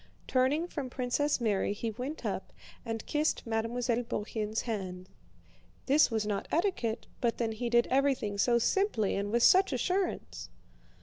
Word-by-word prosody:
Turning 270 +6 +2
from 285 -7 -5
Princess 260 +4 0
Mary 205 -4 +1
he 225 +2 -3
went 260 +8 -6
up - - -3 0.3
and 225 -2 -4
kissed 300 +1 0
Mademoiselle 230 +1 0
Bourienne's 215 -1 -3
hand. 185 -5 -5 0.8
(This 290 +3 +5
was 220 -3 -1
not 205 -2 -2
etiquette, 325 - 0 0.2
but 235 -1 +1
then 230 -2 -1
he 235 +2 -3
did 235 0 +4
everything 260 -7 +1
so 235 +3 +4
simply 235 - +1
and 200 +1 -2
with 235 +1 +2
such 380 -1 +6
assurance!) 365 +8 -2
235 Hz, 145 wpm, -30 LUFS, 220-280 Hz, 0.8 s, such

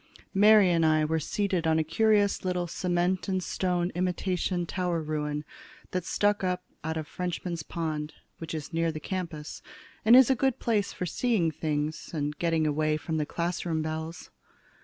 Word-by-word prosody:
Mary 205 -1 +6
and 165 -1 +3
I 155 -1 +4
were 160 +1 0
seated 185 +1 -1
on 160 0 +3
a 160 - +2
curious 205 +5 +2
little 180 -1 0
cement 175 +1 0
and 190 -1 0
stone 180 -1 -1
imitation 180 0 -1
tower 180 -1 -1
ruin 150 -1 -3 0.5
that 180 -1 -2
stuck 205 -1 +1
up 180 0 -1 0.2
out 160 +1 -2
of 155 -1 -4
Frenchman's 175 -1 -4
Pond, 155 -2 -4 0.2
which 165 0 -5
is 155 +2 -6
near 165 0 +1
the 155 - -6
campus, 165 -3 -5 0.4
and 225 +3 +7
is 260 +1 +8
a - - +4
good 265 0 +1
place 210 -4 0
for 180 - -4
seeing 195 -4 +1
things 155 +1 -3
and 150 -1 -2
getting 165 -2 +1
away 155 +1 +1
from 160 +1 -3
the 150 -1 -1
classroom 170 -2 -2
bells. 160 +2 -5
170 Hz, 170 wpm, -28 LUFS, 155-185 Hz, 0.5 s, is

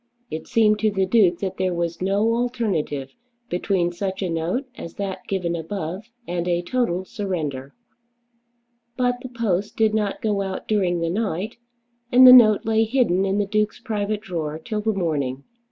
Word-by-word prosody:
It 155 - -5
seemed 215 -3 +3
to 215 +1 +2
the 195 -2 0
Duke 185 -4 +3
that 190 -2 -3
there 185 -1 0
was 170 0 -3
no 200 +4 +2
alternative 220 - -2 0.4
between 180 -1 0
such 190 +2 -4
a 180 - -2
note 165 - -1
as 170 - -9
that 190 -2 -5
given 180 -3 -1
above 180 +4 -5 0.2
and 175 0 -2
a 175 0 0
total 185 -3 -1
surrender. 155 - -4 1.2
But 245 -1 +1
the 255 - -7
post 210 -5 -2
did 220 -1 +3
not 210 -2 -1
go 205 -2 0
out 190 -1 -5
during 185 -5 +1
the 165 0 0
night, 200 0 -2 0.5
and 255 +1 +8
the 250 - +11
note 215 -5 +7
lay 225 0 +3
hidden 220 -6 +1
in 195 +1 0
the 205 - +1
Duke's 210 +2 -1
private 215 -3 -2
drawer 160 -7 -4
till 210 +6 -4
the 220 +1 +1
morning. 145 -9 -2
195 Hz, 170 wpm, -23 LUFS, 175-220 Hz, 1.2 s, the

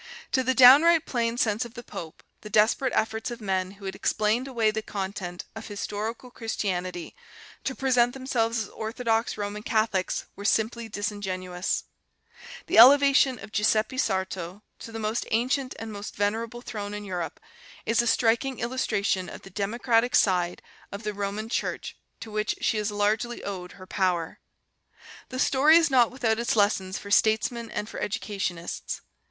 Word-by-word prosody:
To 260 - +2
the 260 +1 +1
downright 295 +6 +8
plain 235 -2 -1
sense 220 -1 +1
of 235 0 -10
the 240 - -8
pope 160 -8 -9 0.2
the 210 - -9
desperate 225 +6 +3
efforts 220 +1 0
of 240 0 -6
men 190 -3 -1
who 200 0 -13
had 190 - -3
explained 215 +5 0
away 230 -5 +1
the 220 +1 -3
content 190 -4 -5
of 220 - -7
historical 215 +4 -5
Christianity 185 -7 -3 0.5
to 265 - -2
present 245 -2 +2
themselves 235 -4 0
as 200 - -10
orthodox 225 0 -1
Roman 205 0 -4
Catholics 215 -4 0
were 200 - -9
simply 225 +2 0
disingenuous.... 190 -4 -3 0.8
The - - +4
elevation 275 +1 +7
of 205 0 -11
Giuseppe 215 +4 +1
Sarto 190 -1 -2 0.2
to 225 - -9
the 225 - -6
most 220 +1 -2
ancient 255 +3 0
and 225 -1 -6
most 205 0 -7
venerable 225 +4 -2
throne 205 -3 -5
in 210 0 -6
Europe 175 -5 -4 0.5
is 230 +1 +3
a 240 - -2
striking 235 +4 +2
illustration 215 -6 -1
of - - -10
the 195 - -12
democratic 230 +4 +1
side 180 -3 +2 0.3
of 200 +2 -7
the 210 0 -2
Roman 205 +2 -3
Church 230 - -3 0.3
to 225 - -8
which 215 -1 -1
she 220 - +1
has 210 0 -1
largely 210 +3 -1
owed 185 -3 -6
her 185 - -12
power.... 180 -3 -1 0.9
The 255 - -6
story 280 +5 +5
is 330 -3 +3
not 245 -3 +5
without 235 -4 0
its 235 - 0
lessons 195 -3 +1
for 200 - -9
statesmen 220 +2 +2
and 210 - -4
for - - -7
educationists. 195 -5 -3
220 Hz, 160 wpm, -26 LUFS, 200-240 Hz, 0.9 s, downright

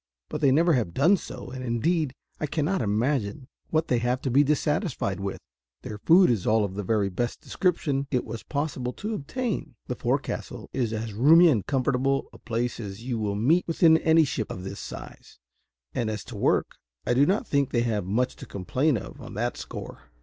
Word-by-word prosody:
But 150 - -4
they 140 -3 +5
never 165 +5 +4
have 110 - 0
done 170 +9 +5
so; 130 -8 -8
and 130 0 -6
indeed 130 +4 0 0.2
I 150 - -1
cannot 165 +5 0
imagine 115 +3 -1 0.2
what 155 0 +1
they 125 - +2
have 125 +2 0
to 130 - -2
be 140 +4 +5
dissatisfied 150 - 0
with: 95 0 -3 0.5
their 105 -1 -6
food 175 - +6
is 105 -6 -1
all 110 -1 +4
of 95 - -5
the 100 - -3
very 105 0 +1
best 120 +6 -2
description 145 -6 0
it 125 -3 0
was 115 - -6
possible 140 -4 -3
to 215 +2 -4
obtain; 220 - -3
the - - -3
forecastle - - -3
is 120 -4 0
as 110 -1 -4
roomy 160 - +7
and 115 -10 +1
comfortable 135 0 +1
a - - -13
place 120 +1 -2
as 100 0 -7
you 120 -2 -2
will 105 -2 -1
meet 150 - +2
with 165 +1 -2
in 160 -1 +7
any 160 0 +5
ship 125 -6 -2
of 90 - -6
this 95 - -6
size; - - -9 0.6
and, 115 -2 -1
as 110 -1 -4
to - - -10
work, - - +1 0.3
I - - +2
do 140 +4 +4
not 205 +6 +1
think 140 - +1
they 120 -3 +1
have 110 -4 0
much 110 +8 0
to 135 - -10
complain 125 - 0
of - - -9
on - - -9
that - - -1
score." - - -8
130 Hz, 205 wpm, -26 LUFS, 110-155 Hz, 0.6 s, roomy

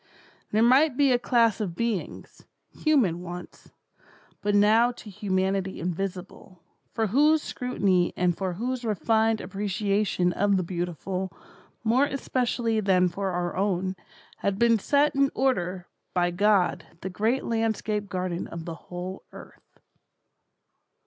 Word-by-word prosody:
There 215 +2 +2
might 260 +3 +4
be 280 -2 +4
a 245 - +3
class 230 -3 +2
of 180 -5 -3
beings, 230 -2 -4 0.3
human 235 - +1
once, 175 0 -9 0.7
but 205 0 +1
now 220 +4 +5
to 215 -3 -11
humanity 190 0 -1
invisible, 180 0 -5 0.3
for 225 - 0
whose 295 +8 +3
scrutiny 195 -8 0
and 175 -1 +2
for 185 -1 -3
whose 245 +6 -3
refined 220 +1 +1
appreciation 200 -1 0
of 200 +1 +2
the 185 - 0
beautiful, 180 +2 -3 0.5
more 240 +5 +3
especially 245 -4 -1
than 185 -3 +3
for 195 +3 -3
our 175 -1 -2
own, 190 -1 0 0.4
had 200 -1 -1
been 230 0 +4
set 290 +7 +2
in 275 0 +3
order 185 -9 0 0.3
by 175 -1 +2
God 200 0 +2 0.2
the 190 - -4
great 225 +8 0
landscape 220 -2 -1
garden 180 -1 -3
of 165 -1 -7
the 170 - -5 0.2
whole 180 +2 -6
earth. - - -15
200 Hz, 130 wpm, -26 LUFS, 180-230 Hz, 0.7 s, now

